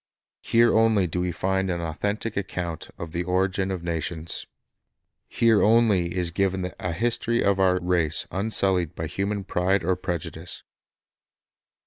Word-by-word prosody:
Here 115 0 +3
only 110 -3 +4
do 90 +1 -2
we 90 0 -1
find 95 +2 -1
an 85 -1 -1
authentic 100 +7 -3
account 90 -4 -4
of 85 -1 -7
the 85 +1 -2
origin 95 +2 0
of 95 -3 -4
nations. 85 -1 -3 0.8
Here 115 -3 +3
only 105 -6 +3
is 90 -2 0
given 95 0 -1
a 90 - -2
history 120 +5 0
of 100 -1 +2
our 90 -1 +3
race 85 -3 +2
unsullied 95 -4 +1
by 80 - -4
human 100 +5 -2
pride 95 0 0
or 90 +2 +1
prejudice. 85 -1 -5
95 Hz, 140 wpm, -25 LUFS, 85-100 Hz, 0.8 s, only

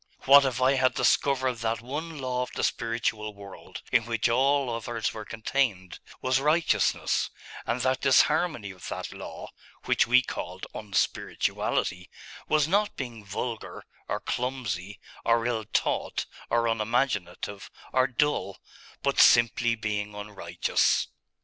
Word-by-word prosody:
What 140 +1 +8
if 130 -2 -1
I 130 +1 +4
had 130 0 +2
discovered 130 -3 +2
that 115 0 -1
one 150 +6 -5
law 130 -2 -2
of 125 - -3
the - - -2
spiritual 115 -2 -1
world, 100 -1 -11
in 115 -2 +3
which 115 -1 +1
all 135 +2 +2
others 115 -1 -3
were 110 -1 -7
contained, 110 -5 -1 0.2
was 130 +1 +2
righteousness; 155 +4 +2 0.4
and 120 +2 0
that 130 +1 +1
disharmony 140 - +3
with 90 - -9
that - - -5
law, - - -8 0.3
which - - +3
we 125 +2 +5
called - - -6
unspirituality, 95 -2 -1 0.4
was 155 -1 +3
not 205 +4 +1
being 120 -5 -6
vulgar, 110 +3 -5 0.2
or - - -2
clumsy, 110 -7 -3 0.2
or 115 0 +2
ill 115 -3 -1
taught, 110 - -1 0.2
or 120 0 +2
unimaginative, 105 -4 -1 0.2
or 130 0 +4
dull, 125 -7 0 0.5
but - - +1
simply 120 0 +5
being 105 -1 -3
unrighteous? 100 -4 0
120 Hz, 130 wpm, -27 LUFS, 105-130 Hz, 0.5 s, What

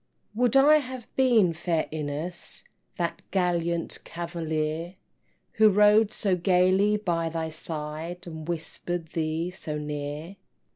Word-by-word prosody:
Would 240 +2 +2
I 290 +3 +7
had 255 -4 -5
been, 235 -10 +4
fair 165 -1 -1
Ines, 155 +3 -2 0.3
That 170 -1 -2
gallant 170 -2 0
cavalier, 165 0 -3 0.6
Who 215 0 +7
rode 210 +1 +5
so 200 -5 +1
gaily 185 +3 +3
by 170 -5 -1
thy 160 0 -3
side, 160 +2 -4
And 160 -2 -8
whisper'd 170 0 -4
thee 160 +2 -1
so 155 -4 -4
near! 150 +4 -5
170 Hz, 115 wpm, -27 LUFS, 160-195 Hz, 0.6 s, I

